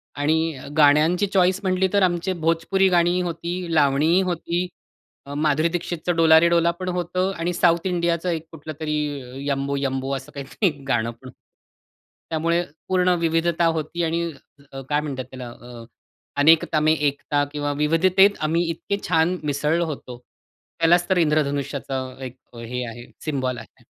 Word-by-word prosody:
आणि 160 Hz, +3 st, +1 dB
अ, 130 Hz, -, -10 dB
गाण्यांची 155 Hz, +6 st, +4 dB
चॉईस 190 Hz, -1 st, +2 dB
म्हंटली 185 Hz, 0 st, +1 dB
तर 200 Hz, -1 st, +4 dB
आमचे 180 Hz, +1 st, 0 dB
भोजपुरी 170 Hz, +4 st, +2 dB
गाणी 175 Hz, 0 st, +3 dB
होती, 175 Hz, 0 st, -4 dB
लावणी 150 Hz, +4 st, +3 dB
होती, 175 Hz, -1 st, -2 dB, 0.6 s
अ, 140 Hz, -, -8 dB
माधुरी 155 Hz, +2 st, +1 dB
दीक्षितच 175 Hz, 0 st, -4 dB
डोला 160 Hz, -1 st, +6 dB
रे 170 Hz, +1 st, +3 dB
डोला 170 Hz, 0 st, +3 dB
पण 185 Hz, 0 st, -3 dB
होतं. 180 Hz, +1 st, -1 dB
आणि 170 Hz, +2 st, -2 dB
साउथ 170 Hz, -1 st, +2 dB
इंडियाच 170 Hz, -1 st, 0 dB
एक 165 Hz, -3 st, -2 dB
कुठलं 155 Hz, -1 st, -8 dB
तरी 150 Hz, -1 st, -1 dB, 0.5 s
यंबो 140 Hz, 0 st, -1 dB
यंबो 135 Hz, 0 st, -2 dB
असं 135 Hz, +2 st, -8 dB
काहीतरी 140 Hz, +9 st, -2 dB
एक 145 Hz, -5 st, -3 dB
गाणं 115 Hz, -3 st, 0 dB
पण 120 Hz, +3 st, -15 dB
होत. 130 Hz, -, -11 dB, 1.0 s
त्यामुळे 165 Hz, +2 st, +1 dB, 0.3 s
पूर्ण 185 Hz, -1 st, +2 dB
विविधता 165 Hz, +1 st, +1 dB
होती. 160 Hz, +3 st, -3 dB
आणि 165 Hz, +1 st, 0 dB, 0.5 s
अ, 135 Hz, -, -7 dB
काय 150 Hz, 0 st, +1 dB
म्हणतात 135 Hz, -4 st, -5 dB
त्याला 130 Hz, -2 st, -8 dB
अ, 120 Hz, 0 st, -12 dB, 0.5 s
अनेकता 155 Hz, +1 st, +4 dB
में 155 Hz, +1 st, +3 dB
एकता 145 Hz, -1 st, 0 dB
किंवा 145 Hz, -1 st, -2 dB
विविधतेत 185 Hz, +6 st, +4 dB
आम्ही 160 Hz, +3 st, +1 dB
इतके 170 Hz, +4 st, -3 dB
छान 170 Hz, +2 st, +2 dB
मिसळलो 150 Hz, +3 st, 0 dB
होतो. 135 Hz, -5 st, -7 dB, 0.6 s
त्यालाच 175 Hz, +2 st, +3 dB
तर 190 Hz, -, +3 dB
इंद्रधनुष्याचा 140 Hz, -4 st, 0 dB, 0.2 s
एक 125 Hz, -1 st, -8 dB, 0.2 s
हे 120 Hz, +2 st, -5 dB
आहे 120 Hz, +1 st, -10 dB, 0.2 s
सिम्बॉल 130 Hz, -5 st, -2 dB
आहे. -, -, -13 dB
160 Hz, 155 wpm, -23 LUFS, 145-175 Hz, 1.0 s, डोला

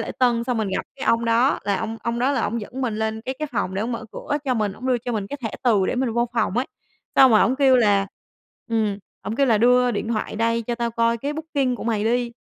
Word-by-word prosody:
lễ -, -, -4 dB
tân 240 Hz, -2 st, +2 dB
xong 250 Hz, -1 st, -1 dB
mình 215 Hz, -2 st, -1 dB
gặp 190 Hz, -, -1 dB
cái 270 Hz, -, -5 dB
ông 230 Hz, 0 st, +3 dB
đó 235 Hz, +4 st, +3 dB
là 200 Hz, -1 st, +1 dB
ông 225 Hz, +1 st, -4 dB
ông 235 Hz, 0 st, -2 dB
đó 260 Hz, +4 st, +2 dB
là -, -, 0 dB
ổng 230 Hz, +3 st, -1 dB
dẫn 255 Hz, +5 st, -7 dB
mình 235 Hz, -5 st, -1 dB
lên 220 Hz, 0 st, -2 dB
cái 260 Hz, +4 st, -4 dB
cái 305 Hz, -, -2 dB
phòng 190 Hz, -5 st, -1 dB
để 195 Hz, -, -1 dB
ổng 235 Hz, +2 st, -2 dB
mở 230 Hz, -1 st, -5 dB
cửa 290 Hz, -, -3 dB
cho 260 Hz, -2 st, +1 dB
mình, 210 Hz, -4 st, 0 dB
ổng 245 Hz, +6 st, -8 dB
đưa 255 Hz, -2 st, +2 dB
cho 245 Hz, +1 st, -5 dB
mình 210 Hz, -3 st, -2 dB
cái 285 Hz, -, -5 dB
thẻ 225 Hz, -, -2 dB
từ 215 Hz, -7 st, +3 dB
để -, -, -1 dB
mình 250 Hz, -2 st, 0 dB
vô 235 Hz, +1 st, 0 dB
phòng 230 Hz, -2 st, 0 dB
ấy. 250 Hz, -, +1 dB, 0.5 s
Xong 265 Hz, -1 st, +8 dB
rồi 215 Hz, -, +6 dB
ổng 260 Hz, +3 st, +2 dB
kêu 270 Hz, -2 st, +5 dB
là 205 Hz, -4 st, +3 dB, 0.6 s
ừm, 215 Hz, -3 st, 0 dB, 0.2 s
ổng 210 Hz, +4 st, -4 dB
kêu 275 Hz, -, +3 dB
là 225 Hz, -4 st, +3 dB
"Đưa 250 Hz, +2 st, +4 dB
điện 225 Hz, -, -3 dB
thoại 215 Hz, -2 st, -2 dB
đây 230 Hz, +1 st, +1 dB
cho 240 Hz, +1 st, -3 dB
tao 235 Hz, -1 st, -2 dB
coi 230 Hz, 0 st, +1 dB
cái 280 Hz, +5 st, -3 dB
booking 295 Hz, -5 st, -1 dB
của -, -, -7 dB
mày 220 Hz, -2 st, 0 dB
đi", 240 Hz, +1 st, 0 dB
235 Hz, 285 wpm, -23 LUFS, 220-250 Hz, 0.6 s, Xong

